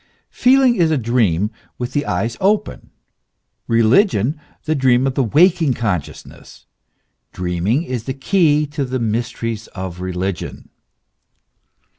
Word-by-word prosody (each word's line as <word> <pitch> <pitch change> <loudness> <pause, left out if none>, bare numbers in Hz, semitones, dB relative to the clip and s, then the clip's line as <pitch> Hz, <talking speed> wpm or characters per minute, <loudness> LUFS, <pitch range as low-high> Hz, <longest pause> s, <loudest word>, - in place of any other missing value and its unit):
Feeling 255 -1 +4
is 170 -2 +3
a 155 - +1
dream 110 -5 +1 0.3
with 125 +1 -5
the 145 -1 -1
eyes 115 0 -1
open; 205 +2 0 0.8
religion 120 - +2 0.2
the 155 - +1
dream 130 -3 +3
of 135 -1 -1
waking 155 - +3
con 105 -8 0
sciousness: - - -14 0.7
dreaming 90 - -1
is 125 -8 -5
the 130 - -4
key 150 -1 +2
to 145 0 -4
the 130 0 -3
mysteries 115 -1 -3
of 90 -2 -6
religion. 95 0 -4
125 Hz, 120 wpm, -19 LUFS, 110-150 Hz, 0.8 s, Feeling